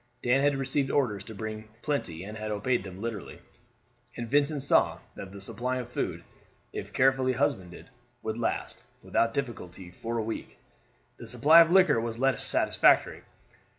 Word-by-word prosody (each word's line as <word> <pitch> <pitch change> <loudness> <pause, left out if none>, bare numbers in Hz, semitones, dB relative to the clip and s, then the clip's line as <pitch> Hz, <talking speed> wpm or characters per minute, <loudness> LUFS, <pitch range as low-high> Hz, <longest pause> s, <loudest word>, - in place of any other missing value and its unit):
Dan 125 +2 +3
had 145 0 +2
received 135 0 -1
orders 110 -10 0
to 110 - -9
bring 110 +1 -6 0.2
plenty 95 - -2
and 105 +2 -8
had 110 0 -5
obeyed 105 +2 0
them 95 -1 -9
literally, 110 -5 -5 0.8
and 120 -1 -4
Vincent 145 +2 +1
saw 140 - +3 0.2
that 95 - -9
the 100 - -10
supply 120 +6 -3
of 125 -1 -6
food, 85 -7 -3 0.5
if - - -6
carefully 130 0 +3
husbanded, 130 -6 -2 0.3
would 110 - -3
last; 115 - -2 0.2
without 115 0 +1
difficulty 95 -9 -5
for 115 +6 -5
a 115 - -1
week. 110 +1 -6 0.6
The 115 - -10
supply 145 +8 +6
of 165 - +4
liquor 185 -10 +5
was 115 0 -4
less 135 -1 +2
satisfactory. - - +3
115 Hz, 160 wpm, -28 LUFS, 105-135 Hz, 0.8 s, supply